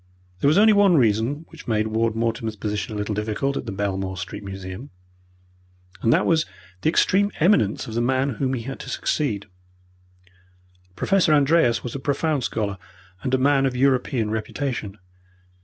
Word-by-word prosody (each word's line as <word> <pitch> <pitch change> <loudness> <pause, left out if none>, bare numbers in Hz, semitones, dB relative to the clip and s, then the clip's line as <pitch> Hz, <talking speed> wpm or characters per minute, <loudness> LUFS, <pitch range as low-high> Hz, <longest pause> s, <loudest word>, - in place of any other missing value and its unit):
There 140 - +2
was 155 +5 +4
only 215 +1 +6
one 200 -4 +5
reason 120 +6 +1
which - - -13
made 110 -2 +1
Ward 110 0 0
Mortimer's 115 -1 -2
position 105 +1 -3
a - - -3
little 105 +1 -2
difficult 110 +6 -2
at - - -4
the - - -3
Belmore 95 -1 -3
Street 90 - -6
Museum, 95 +6 -7 1.1
and 115 - +3
that - - +3
was 160 -2 +2 0.3
the - - +2
extreme 200 +4 +3
eminence 155 - +3
of 110 - -7
the 120 - 0
man 130 +3 +1
whom 130 -1 +1
he 115 - -5
had 135 +3 -6
to - - -8
succeed. 110 -10 -1 1.5
Professor 185 - +3
Andreas 140 -5 +3
was 120 - -5
a 140 - -4
profound 145 0 0
scholar 100 -5 -2 0.4
and 130 +4 0
a - - +2
man 135 0 +3
of 130 - -3
European 125 -4 +1
reputation. 110 -1 -3
120 Hz, 170 wpm, -23 LUFS, 105-145 Hz, 1.5 s, only